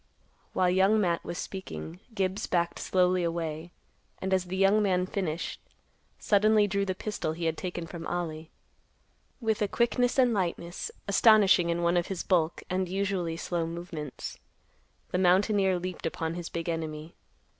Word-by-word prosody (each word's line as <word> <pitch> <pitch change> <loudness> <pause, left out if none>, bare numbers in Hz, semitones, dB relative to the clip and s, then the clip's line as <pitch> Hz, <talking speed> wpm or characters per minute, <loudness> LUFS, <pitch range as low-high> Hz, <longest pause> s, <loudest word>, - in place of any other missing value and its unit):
While 180 -1 +3
Young 190 +4 +4
Matt 175 -4 +1
was 170 - -5
speaking, 80 - -6 0.2
Gibbs 195 +1 -1
backed 170 -1 0
slowly 180 -1 +2
away, 165 -1 -3 0.5
and, 190 0 -2
as 185 -1 +2
the 185 +1 -4
young 195 +2 +4
man 185 -3 +2
finished, 180 -4 -3 0.6
suddenly 210 +1 +4
drew 200 0 0
the 185 -1 -2
pistol 195 -6 -3
he 165 +1 -4
had 160 -1 +1
taken 175 -1 -4
from 165 0 -7
Ollie. 160 -2 -3 0.9
With 220 -3 0
a 210 - +3
quickness 245 +3 +1
and 250 -3 +4
lightness 175 - -2 0.2
astonishing 205 -6 +5
in 170 0 0
one 170 +1 +3
of 175 - +1
his 190 -3 -3
bulk 170 -3 +1
and 185 0 -1
usually 190 -3 -1
slow 170 -1 -2
movements, 165 -4 -6 0.7
the 180 - 0
mountaineer 190 +1 +3
leaped 180 -1 -4
upon 165 0 -3
his 175 -1 -5
big 165 0 -4
enemy. 160 -1 -4
180 Hz, 155 wpm, -29 LUFS, 170-195 Hz, 0.9 s, astonishing